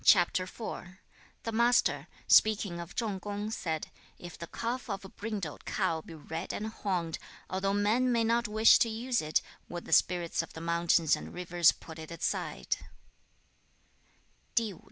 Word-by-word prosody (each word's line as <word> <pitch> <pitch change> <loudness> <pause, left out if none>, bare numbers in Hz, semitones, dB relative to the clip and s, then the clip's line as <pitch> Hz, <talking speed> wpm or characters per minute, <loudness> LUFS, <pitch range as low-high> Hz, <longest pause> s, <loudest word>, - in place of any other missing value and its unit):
The 230 - -2
Master, 235 +2 +3 0.2
speaking 205 -5 +4
of 170 +1 -8
Chung 210 -5 -1
kung, 205 +2 -4
said, 160 -7 -3 0.3
'If 175 -1 -9
the 170 - -7
calf 240 +5 -3
of 195 -1 -4
a - - -9
brindled 200 -8 -5
cow 175 -6 0
be 165 - -11
red 160 +3 -5
and 210 - -3
horned, 185 -7 -2 0.3
although 195 +1 0
men 225 +5 +3
may 230 -1 +3
not 230 +1 +2
wish 215 +1 +6
to 230 - +3
use 235 +3 0
it, 155 0 +1 0.3
would 175 0 -6
the - - -2
spirits 175 -2 +3
of 165 - -10
the - - -7
mountains 170 -1 +3
and - - -9
rivers 175 -1 +4
put 160 0 -11
it 160 - -8
aside?' 170 - -2
190 Hz, 150 wpm, -31 LUFS, 170-220 Hz, 0.3 s, wish